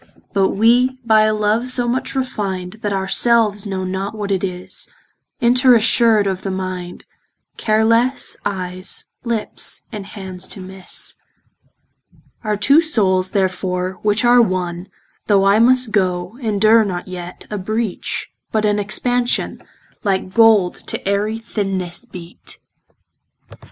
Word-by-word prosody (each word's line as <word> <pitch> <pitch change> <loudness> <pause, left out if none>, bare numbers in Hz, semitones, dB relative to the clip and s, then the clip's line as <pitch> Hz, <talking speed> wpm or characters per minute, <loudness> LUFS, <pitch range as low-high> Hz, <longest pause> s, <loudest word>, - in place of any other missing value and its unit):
But 195 -2 +3
we 245 +5 +3
by 220 -1 +5
a 215 - +2
love, 215 +4 +1
so 245 -1 +3
much 255 +3 -2
refin'd, 205 -6 -3
That 205 - -2
our 190 -1 -1
selves 220 -4 +2
know 190 -1 -3
not 190 +3 -3
what 205 -2 -4
it 190 -1 0
is, 180 -1 -3 0.5
Inter 250 +1 +5
assured 225 -1 +4
of 190 -1 -2
the 195 - -4
mind, 185 -2 -5 0.5
Care 220 0 +2
lesse, 235 +4 +2
eyes, 185 -1 -3 0.2
lips, 235 -3 -2
and 205 -2 -7
hands 190 -3 -9
to - - -8
misse. 190 0 -4 1.3
Our 210 -1 -1
two 275 +10 +5
soules 190 - +1
therefore, 185 -1 -1
which 210 +3 +2
are 240 0 +6
one, 180 -3 -2 0.4
Though 195 -2 +4
I 200 +2 +4
must 250 0 +4
goe, 185 -1 0
endure 220 0 +4
not 185 -3 -4
yet 180 -1 -8
A 210 - -3
breach, 215 +1 -3 0.2
but 215 -1 +1
an 210 0 +2
expansion, 240 +4 -1 0.4
Like 190 -2 -1
gold 220 -6 +4
to - - -2
ayery 205 +2 0
thinnesse 195 -6 -4
beate. 175 -1 -10
205 Hz, 135 wpm, -19 LUFS, 185-225 Hz, 1.3 s, are